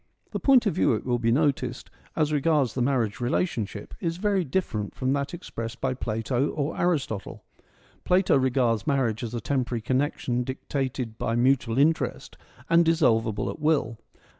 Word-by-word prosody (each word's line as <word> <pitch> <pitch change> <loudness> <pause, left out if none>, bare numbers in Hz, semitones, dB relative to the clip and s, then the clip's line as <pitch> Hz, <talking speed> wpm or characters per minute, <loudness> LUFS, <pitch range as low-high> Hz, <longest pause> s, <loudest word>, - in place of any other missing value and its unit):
The - - -3
point 265 -4 +5
of 205 - +1
view, 180 - +2
it 110 - -3
will 120 -1 0
be 115 -1 +1
noticed, 130 -2 0 0.2
as 155 -1 +1
regards 145 -4 +2
the 130 - -2
marriage 120 -5 0
relationship, 120 - -2
is 165 -1 -2
very 200 -1 +1
different 130 - -2
from 130 0 0
that 140 0 -2
expressed 115 -9 -6
by 130 +1 0
Plato 120 +3 -1
or 150 +1 -2
Aristotle. 145 - -2 0.6
Plato 180 -3 +3
regards 125 -5 +1
marriage 125 -5 0
as 120 0 -4
a - - -1
temporary 125 -1 -1
connection 130 -1 0
dictated 130 -3 -4
by 115 - -1
mutual 120 -1 +2
interest 155 +3 +1 0.3
and 170 +1 +5
dissolvable 120 - +2
at - - -10
will. 150 -7 +1
130 Hz, 160 wpm, -26 LUFS, 115-150 Hz, 0.6 s, point